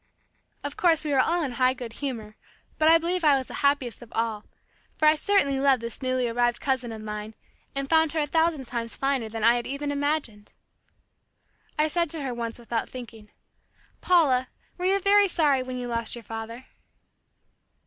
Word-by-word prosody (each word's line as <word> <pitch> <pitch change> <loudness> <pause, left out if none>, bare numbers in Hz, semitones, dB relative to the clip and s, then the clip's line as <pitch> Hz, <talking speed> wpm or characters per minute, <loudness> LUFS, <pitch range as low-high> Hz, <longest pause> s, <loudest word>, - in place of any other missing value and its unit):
Of 285 0 -4
course, 325 -3 +3
we 300 - -1
were 275 - +3
all 340 +6 +2
in 270 - -2
high 255 +1 +2
good 240 -3 -7
humor, 225 -6 -5 0.4
but 315 0 +5
I 330 - +8
believe 345 +2 -1
I 290 -3 +5
was 260 - -5
the - - -8
happiest 280 -5 +1
of 240 - -13
all, 225 -2 -2 0.5
for 310 - +3
I 305 - +7
certainly 300 -5 +2
loved 270 -2 +4
this 235 +2 -5
newly 255 -1 0
arrived 240 +1 +1
cousin 260 -4 -1
of 220 -1 -8
mine 210 0 -6 0.4
and 275 0 -2
found 320 0 +3
her 320 - 0
a 295 - +1
thousand 320 -2 +1
times 235 -1 -3
finer 270 -5 0
than 225 0 -5
I 235 +2 +5
had 240 - -4
even 285 +1 -3
imagined. 285 -7 -2 1.2
I 305 0 +3
said 340 +1 0
to 310 -1 -4
her 260 -2 -3
once 230 -1 -4
without 235 -1 -3
thinking, 225 -4 -10 0.7
"Paula, 275 -8 +3 0.3
were 360 - -4
you 390 +1 +3
very 400 +1 +5
sorry 300 -7 +2
when 255 0 -5
you 245 -1 -4
lost 230 -1 -1
your 235 - -9
father?" 225 +3 -7
260 Hz, 190 wpm, -26 LUFS, 235-305 Hz, 1.2 s, I